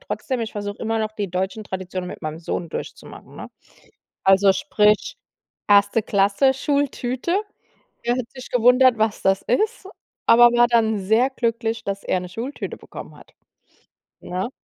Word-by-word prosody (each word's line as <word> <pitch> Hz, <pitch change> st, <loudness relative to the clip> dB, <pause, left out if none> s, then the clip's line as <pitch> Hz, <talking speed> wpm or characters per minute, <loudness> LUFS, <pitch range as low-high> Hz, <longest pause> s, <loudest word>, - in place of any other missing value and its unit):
trotzdem, 260 Hz, -, -4 dB
ich 225 Hz, -1 st, -4 dB
versuche 205 Hz, 0 st, -5 dB
immer 225 Hz, 0 st, -1 dB
noch 215 Hz, 0 st, -2 dB
die 205 Hz, -4 st, -4 dB
deutschen 190 Hz, +4 st, -3 dB
Traditionen 185 Hz, -1 st, -5 dB
mit -, -, -9 dB
meinem 155 Hz, 0 st, -5 dB
Sohn 170 Hz, +1 st, -4 dB
durchzumachen, -, -, -9 dB
ne? -, -, -8 dB, 0.8 s
Also 195 Hz, +1 st, +5 dB
sprich 220 Hz, -, +1 dB, 0.5 s
1. 205 Hz, +2 st, +4 dB
Klasse 205 Hz, +7 st, +2 dB
Schultüte. 280 Hz, +4 st, -1 dB, 0.6 s
Er 240 Hz, -, +1 dB
hat 240 Hz, -2 st, -4 dB
sich 255 Hz, -1 st, -11 dB
gewundert, 250 Hz, 0 st, +5 dB
was 220 Hz, -1 st, 0 dB
das 195 Hz, 0 st, +2 dB
ist, 425 Hz, -, -1 dB, 0.4 s
aber 240 Hz, +1 st, +8 dB
war 240 Hz, 0 st, +5 dB
dann 220 Hz, -3 st, +2 dB
sehr 220 Hz, +7 st, +2 dB
glücklich, 230 Hz, -2 st, -2 dB
dass 200 Hz, 0 st, -4 dB
er 185 Hz, -, 0 dB
'ne 180 Hz, -, -8 dB
Schultüte 235 Hz, +9 st, -6 dB
bekommen -, -, -11 dB
hat, -, -, -18 dB, 0.9 s
ne? 185 Hz, +5 st, -4 dB
220 Hz, 150 wpm, -22 LUFS, 195-250 Hz, 0.9 s, aber